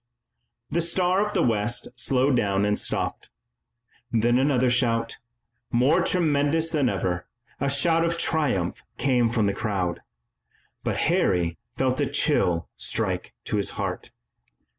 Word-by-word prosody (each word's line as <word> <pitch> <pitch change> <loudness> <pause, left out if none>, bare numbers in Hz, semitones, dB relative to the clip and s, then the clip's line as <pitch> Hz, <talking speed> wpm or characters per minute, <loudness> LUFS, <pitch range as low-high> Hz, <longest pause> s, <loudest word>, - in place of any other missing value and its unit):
The 170 - +1
Star 180 +3 +1
of 210 0 -4
the 175 - +3
West 115 0 0
slowed 130 +2 +2
down 100 -3 +1
and 105 0 +1
stopped. - - -2 0.8
Then 120 +2 +2
another 130 -2 +2
shout, 115 -2 0 0.5
more 135 +9 +3
tremendous 160 -2 +1
than 145 -6 +2
ever, 90 -2 -2 0.3
a 140 - 0
shout 165 +4 +3
of 170 0 0
triumph, 145 - 0 0.2
came 125 -4 +2
from 115 -2 +1
the 100 - +1
crowd, 95 -5 -2 0.8
but - - -1
Harry 85 -2 +1 0.2
felt 130 0 0
a 145 - +1
chill 115 - +1
strike - - -1
to - - -1
his - - 0
heart. - - -4
125 Hz, 135 wpm, -25 LUFS, 105-155 Hz, 0.8 s, the